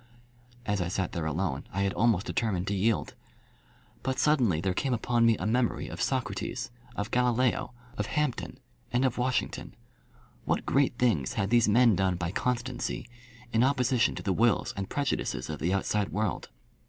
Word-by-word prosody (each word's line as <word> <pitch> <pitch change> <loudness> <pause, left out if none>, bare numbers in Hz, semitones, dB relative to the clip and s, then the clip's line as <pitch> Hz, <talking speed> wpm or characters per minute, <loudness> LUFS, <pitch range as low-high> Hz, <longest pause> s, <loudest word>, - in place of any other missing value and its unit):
As 100 -2 0
I 85 - -1
sat 95 0 -2
there 80 -2 -2
alone 80 -3 -2
I 100 - -1
had 100 0 0
almost 110 -4 +2
determined 100 -6 -1
to - - 0
yield. 105 +3 0 0.9
But 130 0 -2
suddenly 125 - +3
there 95 +2 0
came 130 +6 0
upon 120 0 +2
me 115 -2 +4
a - - -4
memory 120 +2 +1
of - - -6
Socrates, 120 -1 -2 0.2
of 100 0 -3
Galileo, 125 0 +1 0.3
of 105 - 0
Hampden, 150 -5 -2 0.3
and 125 +2 +2
of 125 -1 0
Washington. 125 0 -1 0.7
What - - -1
great 135 -3 +2
things 105 - +1
had 100 +2 -1
these 120 -3 +5
men 115 0 +5
done 95 0 +1
by 90 0 -3
constancy, 125 +2 -2 0.5
in 115 +1 +4
opposition 125 -2 +2
to - - -6
the 95 - +1
wills 115 +3 +2
and 100 -1 -4
prejudices 145 - -2
of 75 - -5
the 85 - 0
outside 100 +1 0
world! 105 -2 -2
115 Hz, 170 wpm, -29 LUFS, 95-125 Hz, 0.9 s, these